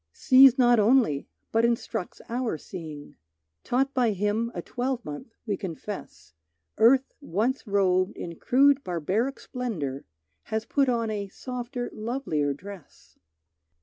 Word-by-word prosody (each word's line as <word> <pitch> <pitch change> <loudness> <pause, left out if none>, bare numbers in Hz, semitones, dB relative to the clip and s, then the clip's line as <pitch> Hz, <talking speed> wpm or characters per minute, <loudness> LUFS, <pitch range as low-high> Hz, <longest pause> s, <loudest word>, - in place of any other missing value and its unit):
Sees 260 0 +7
not 240 -2 +5
only, 215 - +3 0.2
but 225 +1 +2
instructs 235 -6 -1
our 235 -6 -2
seeing; 155 -3 -9 0.5
Taught 270 +3 0
by 240 -4 +2
him 210 +4 -1
a 175 - -3
twelvemonth, 245 - -4
we 210 -3 -1
confess 165 - -7 0.5
Earth 260 +4 +5
once 245 - -1
robed 190 0 +2
in 170 -1 -6
crude 280 +2 +4
barbaric 190 - -1
splendor, 165 - -4 0.4
Has 220 0 -2
put 275 +2 +2
on 230 -2 0
a 205 -2 -3
softer 245 +3 -5
lovelier 215 - -1
dress. 190 +4 -11
225 Hz, 120 wpm, -26 LUFS, 185-250 Hz, 0.5 s, Sees